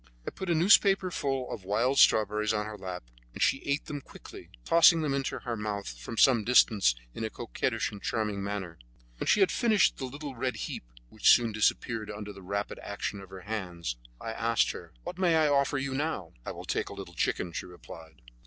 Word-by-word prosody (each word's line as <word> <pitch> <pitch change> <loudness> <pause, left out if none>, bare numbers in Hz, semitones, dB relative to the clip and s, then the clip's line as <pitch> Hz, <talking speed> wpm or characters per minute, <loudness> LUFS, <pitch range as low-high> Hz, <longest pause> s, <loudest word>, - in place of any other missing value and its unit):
I - - -4
put 190 - -6
a 170 - +3
newspaper 190 +2 +5
full 135 -5 -2
of 105 - -7
wild 115 +8 +1
strawberries 105 0 +4
on 105 0 -1
her 110 0 -6
lap, 95 -5 -6 0.3
and - - -7
she 135 - +2
ate 140 +2 -1
them 145 -1 -5
quickly, - - -13 0.2
tossing 165 0 +6
them 150 -3 0
into 135 -1 -2
her 120 -1 -4
mouth 105 -2 -4
from 110 - -7
some 120 -3 +5
distance 105 - +4 0.2
in - - -5
a 110 - -1
coquettish - - -2
and 100 -1 -10
charming 105 -4 -2
manner. 100 -5 -5 0.4
When - - -3
she 210 - +4
had 190 - +4
finished 220 -4 +3
the 130 - -4
little 140 +2 -7
red 125 +1 -2
heap, - - -5 0.2
which 110 - +2
soon 120 -2 +6
disappeared 110 +1 0
under 105 0 -7
the 100 - -12
rapid 100 +2 -4
action 100 0 -4
of 95 - -13
her 95 -1 -10
hands, 90 - -4 0.2
I 115 - -5
asked 115 0 +1
her: - - -10
"What 180 - -7
may 175 -3 +3
I 155 -1 +4
offer 140 0 +2
you 135 0 -2
now?" 135 - -3
"I - - -2
will - - -9
take - - -2
a - - -8
little - - -9
chicken," 90 - -1
she - - -5
replied. 80 -5 -13
110 Hz, 210 wpm, -29 LUFS, 100-140 Hz, 0.4 s, tossing